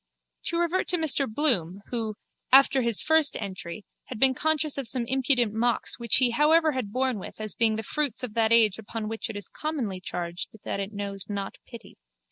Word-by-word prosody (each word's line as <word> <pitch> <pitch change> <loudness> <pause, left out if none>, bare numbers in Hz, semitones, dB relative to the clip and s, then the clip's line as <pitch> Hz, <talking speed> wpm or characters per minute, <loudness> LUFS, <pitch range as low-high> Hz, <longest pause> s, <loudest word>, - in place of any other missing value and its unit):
To 335 - -1
revert 345 +2 0
to 355 - +1
Mr 285 -6 +1
Bloom 205 - +1
who, 225 -3 -2 0.4
after 270 0 +6
his 235 -3 +4
first 315 -2 +2
entry, 190 -1 -7 0.2
had 250 - -8
been 265 +1 +5
conscious 305 0 0
of 265 - -4
some 245 -1 +2
impudent 250 -3 +2
mocks 240 +3 0
which 235 -2 +2
he 250 -2 +4
however 310 +5 +3
had 255 -7 -4
borne 255 -2 -1
with - - -10
as 215 -3 -3
being 225 -2 +2
the 220 - -4
fruits 280 0 -2
of 240 -4 -5
that 225 -1 +1
age 220 -4 +4
upon 220 0 -6
which 225 +1 -4
it 220 - -6
is 205 - -6
commonly 260 -12 -4
charged 175 -1 -5
that - - -3
it 200 +1 -4
knows 200 -1 -4
not 200 -1 -5
pity. 235 -2 -13
235 Hz, 200 wpm, -26 LUFS, 210-275 Hz, 0.4 s, after